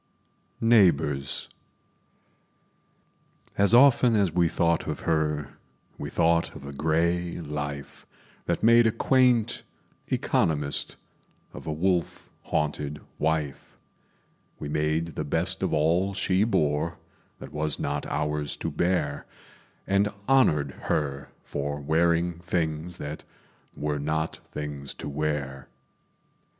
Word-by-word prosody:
Neighbors 80 -11 +3 2.1
As 100 0 +4
often 125 -2 +6
as 100 -5 +2
we 85 0 +2
thought 85 0 +1
of - - -3
her, 75 -3 -1 0.4
We - - -4
thought 85 0 +2
of 70 - -9
a 70 - -7
gray 85 +4 0
life 75 -3 -6 0.4
That - - -1
made 115 +1 +6
a - - +3
quaint 125 -2 +3 0.5
economist 75 -3 0 0.6
Of - - -10
a - - -1
wolf 85 +2 -1
haunted 75 -1 -2 0.2
wife; 75 -3 -2 0.8
We 75 - -6
made 75 +2 0
the 80 - -4
best 85 +6 -1
of 95 - 0
all 85 +6 +2
she 95 +1 +2
bore 80 -6 0 0.4
That - - -10
was 75 0 -1
not 70 +1 -2
ours 75 -1 -1
to - - -3
bear, 85 -5 0 0.6
And 100 +1 +2 0.2
honored 75 - +4 0.2
her 70 -2 -1
for 70 0 -3
wearing 85 +3 +1
things 85 -1 -2
That 75 +1 -6 0.5
were 75 -1 -1
not 80 +2 -1
things 70 -2 -5
to - - -7
wear. 70 -2 -3
80 Hz, 115 wpm, -26 LUFS, 75-90 Hz, 2.1 s, often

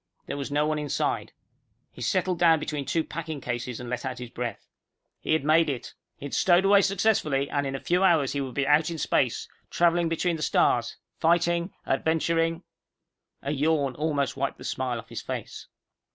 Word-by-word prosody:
There - - -4
was 140 0 -4
no 145 +1 +1
one 155 0 0
inside. 145 -2 -1 0.6
He - - -12
settled 180 +7 0
down 165 -2 +5
between 150 -2 -4
two 160 +4 0
packing 160 -3 -5
cases 120 -1 -4
and 125 - -7
let 125 +1 -3
out 130 -2 -4
his 125 -1 -8
breath. 120 -1 -5 0.5
He - - -1
had 160 - +2
made 155 +1 +4
it. 125 -4 -5 0.2
He - - -9
had 145 - -7
stowed 180 +1 +4
away 200 0 +6
successfully, 195 -9 +1
and 145 -1 0
in 135 - -3
a - - -3
few 180 +6 +1
hours 165 -8 +3
he 140 - -1
would 130 -3 -5
be 140 - +1
out 150 +3 +3
in 165 - -4
space, - - 0 0.2
traveling 170 -1 +2
between 165 +1 0
the - - -8
stars, - - +2 0.2
fighting, 170 +2 +2
adventuring 165 +3 +1 0.8
A 140 - -2
yawn 145 -2 +1
almost 145 -1 -1
wiped 140 0 -2
the - - -11
smile 125 -2 -2
off 115 - -10
his - - -5
face. - - -6
150 Hz, 195 wpm, -26 LUFS, 135-170 Hz, 0.8 s, away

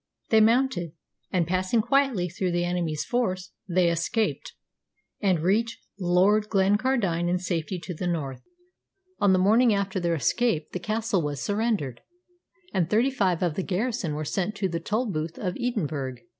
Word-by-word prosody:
They 220 -1 +6
mounted, 220 - +2 0.4
and, 180 -3 +1
passing 185 +6 +1
quietly 270 -8 +2
through 180 +1 -2
the 175 0 +1
enemy's 170 -4 -1
force, 185 -7 -1 0.2
they 180 0 +3
escaped, 210 +7 -1 0.7
and 185 -6 +2
reached 225 +6 +1 0.2
Lord 195 +4 +3
Glencardine 195 -3 +2
in 180 - +2
safety 180 0 -2
to 180 - -6
the 180 +2 -4
north. 145 -7 -3 0.8
On 200 - +4
the 185 - +5
morning 220 +4 +4
after 195 -1 -1
their 170 -1 0
escape 160 - 0
the 180 - -4
castle 215 0 0
was 145 -2 -3
surrendered, 205 - -1 0.7
and 175 -3 +1
thirty 230 +6 +3
five 185 -9 +1
of 175 -3 +1
the 190 - -2
garrison 195 -4 -2
were 155 +1 -3
sent 195 +6 -2
to 195 -1 0
the 170 -2 -3
Tolbooth 170 -5 -2
of 180 -3 -3
Edinburgh. 155 - -2
185 Hz, 155 wpm, -26 LUFS, 170-215 Hz, 0.8 s, They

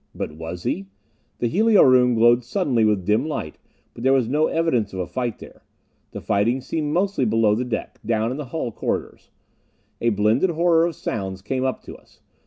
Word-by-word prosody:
But - - -4
was 80 +3 -7
he? 95 - -2 0.5
The 120 - 0
helio 215 - +4
room 125 -2 +5
glowed 120 +2 +4
suddenly 125 - 0
with 105 -4 +1
dim 105 +4 +2
light, 80 - -5 0.3
but - - -11
there 135 +1 +4
was 130 -4 +2
no 150 +5 +2
evidence 125 -12 0
of 95 - -5
a 90 - -1
fight 120 +7 -3
there. - - -14 0.5
The - - -8
fighting 110 +5 +1
seemed 150 +3 -3
mostly 190 -2 0
below 110 -2 +2
the 115 +4 -1
deck, 125 - -5
down 110 +1 0
in 130 - -4
the 150 - -5
hull 125 -2 -4
corridors. - - -4 0.7
A 115 - +2
blended 110 - +2
horror 170 0 +3
of 170 - -5
sounds 95 -6 -5
came 130 +4 -2
up 130 -1 -2
to - - -10
us. - - -21
120 Hz, 195 wpm, -22 LUFS, 105-150 Hz, 0.7 s, room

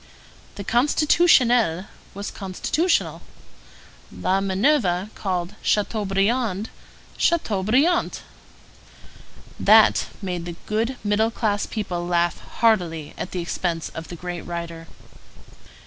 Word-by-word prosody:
The 200 - -6
Constitutionnel 245 - +3 0.3
was 200 0 -5
constitutional. 290 - -1 0.9
La 190 +1 0
Minerve 195 -1 +1
called 180 -1 -3
Chateaubriand 210 +1 0 0.5
Chateaubriant. 275 - +1 1.4
That - - +7
t - - -1
made 180 -4 -4
the 175 -1 -6
good 230 +4 -1
middle 210 +2 +2
class 210 -3 -1
people 185 -5 -3
laugh 175 -1 +1
heartily 175 -9 0
at - - -5
the 180 - -3
expense 170 -1 -2
of 165 0 -8
the 175 - -8
great 175 0 -6
writer. 170 -1 -6
195 Hz, 100 wpm, -23 LUFS, 175-230 Hz, 1.4 s, That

